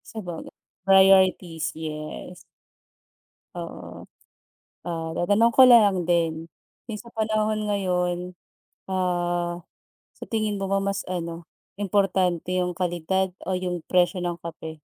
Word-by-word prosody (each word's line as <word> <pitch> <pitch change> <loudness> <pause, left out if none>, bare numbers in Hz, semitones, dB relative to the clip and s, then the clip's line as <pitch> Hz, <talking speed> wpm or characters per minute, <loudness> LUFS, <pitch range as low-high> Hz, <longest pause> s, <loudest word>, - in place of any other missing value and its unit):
Sabaga 175 -6 -6 0.4
priorities, 190 -4 +4
yes. 155 +2 -6 1.2
Oo. - - -8 0.8
Ah, 165 -2 -3
tatanong 205 +6 +3
ko 260 - +10
na 240 -2 +9
lang 180 -3 -2
din, 165 -2 0 0.4
'yung 215 -3 -6
sa 235 - -14
panahon 215 -1 0
ngayon, 180 -3 0 0.7
ah, 175 -1 -1 0.5
sa - - -10
tingin 215 -2 0
mo 195 -1 -3
ba 195 - +3
mas 195 0 -2
ano, 170 -1 -4 0.3
importante 185 -3 0
'yung 180 -1 0
kalidad 180 +1 -1
o 190 - -3
'yung 180 -2 -2
presyo 180 0 +1
ng 175 -1 -3
kape? 160 -1 -8
180 Hz, 115 wpm, -25 LUFS, 175-195 Hz, 1.2 s, ko